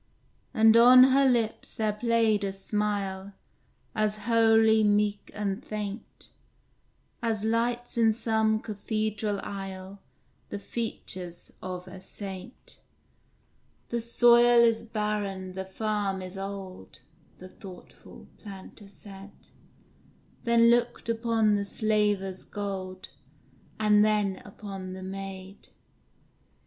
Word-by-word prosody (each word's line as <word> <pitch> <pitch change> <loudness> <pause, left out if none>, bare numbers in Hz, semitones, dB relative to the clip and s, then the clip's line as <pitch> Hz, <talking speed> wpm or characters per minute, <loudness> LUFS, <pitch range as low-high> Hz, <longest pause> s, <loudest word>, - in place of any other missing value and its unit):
And 220 0 +5
on 250 +2 +9
her 275 0 +5
lips 230 -3 -1
there 215 -1 0
played 225 -1 +1
a 195 - -1
smile 200 -1 -3 0.6
As 215 -1 -1
holy, 225 -1 +4
meek, 205 0 +1
and 205 +2 -3
faint, 210 0 -7 0.9
As 220 -3 0
lights 235 +2 -1
in 225 -1 +5
some 220 -1 +1
cathedral 215 -1 -2
aisle 195 0 -7 0.5
The - - -4
features 185 -5 -6
of 180 0 -6
a 185 0 -10
saint. 195 +4 -9 1.1
"The 235 - -1
soil 240 +1 +5
is 230 -1 +3
barren, 210 -4 -3
the 190 +1 -5
farm 200 -1 -2
is 185 +1 -8
old;" 195 - -8 0.4
The 185 - -11
thoughtful 185 -2 -13
Planter 200 0 -11
said; 195 0 -13 1.0
Then 235 0 +5
looked 240 -1 0
upon 225 -2 +2
the 205 -1 +1
Slaver's 205 -2 0
gold, 190 -2 -6 0.7
And 210 -1 +4
then 210 -3 +1
upon 195 -2 -8
the 185 0 -8
maid. 195 0 -8
210 Hz, 105 wpm, -27 LUFS, 195-225 Hz, 1.1 s, on